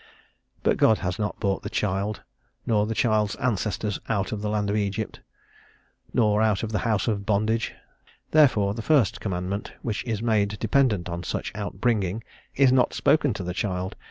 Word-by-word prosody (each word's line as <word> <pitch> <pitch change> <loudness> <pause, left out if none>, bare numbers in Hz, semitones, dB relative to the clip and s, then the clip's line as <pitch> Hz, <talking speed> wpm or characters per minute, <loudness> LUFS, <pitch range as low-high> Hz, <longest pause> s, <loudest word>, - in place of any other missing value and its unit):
But - - +2
God 110 - +5
has 90 +2 -2
not 105 0 -2
brought 100 -1 0
the 105 - -5
child, 105 0 -1 0.4
nor 105 -2 +2
the 115 - -2
child's 105 -3 +2
ancestors, 105 -3 -1
out 105 -3 0
of 105 - -3
the 105 - -2
land 105 -1 0
of - - 0
Egypt, 105 +1 -2 0.9
nor 105 -2 +3
out 110 -2 +2
of 110 - -3
the 110 - 0
house 110 -3 0
of 105 -3 0
bondage: 110 +3 0 0.6
therefore 110 -10 +4
the 115 - -5
first 135 -5 +2
commandment, 95 +1 -3
which 110 -4 -2
is 115 -2 -2
made 105 -3 +1
dependent 110 -6 +2
on 85 0 -4
such 90 - -3
out 100 -2 -5
bringing, 105 -3 0 0.3
is 135 -2 +5
not 130 -1 +3
spoken 145 -3 +3
to 95 - -4
the 90 0 -3
child. 95 -1 -2
105 Hz, 180 wpm, -25 LUFS, 100-115 Hz, 0.9 s, God